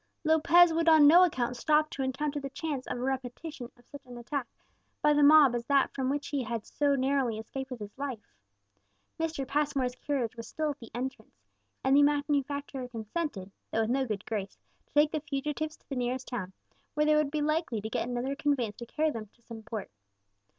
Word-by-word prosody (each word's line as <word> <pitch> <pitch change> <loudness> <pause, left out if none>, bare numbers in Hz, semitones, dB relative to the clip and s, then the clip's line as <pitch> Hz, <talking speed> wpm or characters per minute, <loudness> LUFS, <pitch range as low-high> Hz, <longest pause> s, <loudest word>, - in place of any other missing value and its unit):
Lopez 325 +2 +5
would 330 0 +3
on 315 -2 +7
no 340 +5 +8
account 250 -8 0
stop 305 +4 +2
to 275 - -4
encounter 280 +3 -2
the 275 -1 -5
chance 280 -1 -4
of - - -3
a - - -5
repetition 260 +1 -4
of 245 - -23
such 285 +1 -12
an 245 -1 -9
attack 245 +1 -4 0.5
by 300 - +4
the 295 - +3
mob 290 -3 +7
as 240 -1 -2
that 280 -1 +3
from 260 -1 -1
which 290 +1 -2
he 285 -2 -1
had 230 -2 -4
so 285 -1 +1
narrowly 265 -4 +1
escaped 265 +5 -6
with 210 -5 -8
life. 255 -7 -6 0.9
Mr. 320 -5 -2
Passmore's 280 -3 0
carriage 250 -3 -2
was 230 -1 -8
still 310 -1 -2
at 290 - -9
the 230 - -11
entrance, 240 - -6 0.4
and 265 +1 +4
the 290 - +7
manufacturer 285 -2 0
consented, 225 - -4 0.2
though 225 - 0
with 220 +1 0
no 265 0 +1
good 210 -2 -4
grace, 205 -4 -4 0.3
to - - -36
take 295 +1 +5
the 310 - -1
fugitives 300 +1 -3
to - - -36
the 275 - -5
nearest 250 +1 -2
town, 205 -7 -4 0.4
where 300 0 +2
they 305 - +4
would 300 -2 +2
be 300 0 -1
likely 305 -6 0
to 210 - -5
get 225 +2 -2
another 250 +3 -2
conveyance 275 -8 -1
to 235 - -8
carry 310 +3 0
them 225 -5 -6
to 235 +4 -33
some 230 -1 -9
port. 215 -2 -6
270 Hz, 205 wpm, -29 LUFS, 240-295 Hz, 0.9 s, no